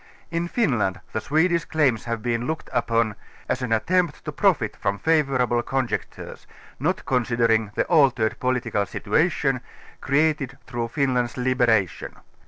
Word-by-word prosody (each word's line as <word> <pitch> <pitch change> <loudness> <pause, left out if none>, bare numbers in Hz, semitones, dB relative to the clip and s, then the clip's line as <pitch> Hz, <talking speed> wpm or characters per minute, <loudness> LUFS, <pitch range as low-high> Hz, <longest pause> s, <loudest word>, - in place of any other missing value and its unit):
In 170 +1 -1
Finland 120 - 0
the 110 - -1
Swedish 165 +2 +2
claims 135 -8 +1
have 115 -2 -3
been 120 0 -1
looked 160 0 -4
upon 115 -2 +1 0.3
as 130 0 -1
an 125 -2 -3
attempt 170 +8 +1
to - - -3
profit - - +1
from 100 +1 -2
favourable 135 -5 +2
conjunctures, 130 0 -4 0.3
not - - -1
con 125 -2 +1
sidering 115 -3 +1
the - - +1
altered 130 -9 +3
political 120 -5 0
situation, - - 0 0.4
created 140 -2 +1
through 120 -2 -3
Fin 135 +2 0
land's 125 0 -1
liberation. 120 -7 +1
125 Hz, 140 wpm, -24 LUFS, 115-145 Hz, 0.4 s, altered